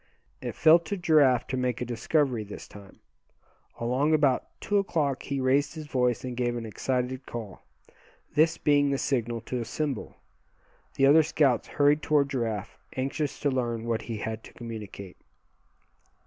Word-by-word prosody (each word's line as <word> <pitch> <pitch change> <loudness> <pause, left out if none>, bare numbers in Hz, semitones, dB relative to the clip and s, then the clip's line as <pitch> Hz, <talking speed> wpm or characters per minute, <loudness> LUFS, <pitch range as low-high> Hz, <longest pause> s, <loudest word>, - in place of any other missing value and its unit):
It - - -5
fell 160 +1 +7
to 185 +4 -5
Giraffe 150 -9 +4
to - - -1
make 125 -2 -1
a 125 - -2
discovery 120 +1 0
this 105 - -9
time. 100 -1 -14 0.8
Along 130 +6 +2
about 140 -4 +2
two 205 0 +1
o'clock 150 -8 0
he 140 -1 -3
raised 135 +4 +2
his 155 -1 -6
voice 125 -5 0
and 125 -1 -4
gave 120 -1 -1
an 115 - -5
excited 125 +3 -2
call. 110 -5 -7 0.7
This 160 +2 +3
being 145 -1 +3
the 140 - +1
signal 120 -4 -1
to 125 +2 -4
assemble, 135 +2 -3 0.8
the 135 - +4
other 150 +4 +7
scouts 145 -6 +2
hurried 145 +1 +3
toward 145 -3 +2
Giraffe, 115 -6 -3 0.2
anxious 135 +2 -2
to 145 - +1
learn 120 -3 -2
what 115 -1 -1
he 115 -1 -5
had 110 +1 -5
to - - -14
communicate. 105 -5 -8
130 Hz, 160 wpm, -27 LUFS, 115-145 Hz, 0.8 s, fell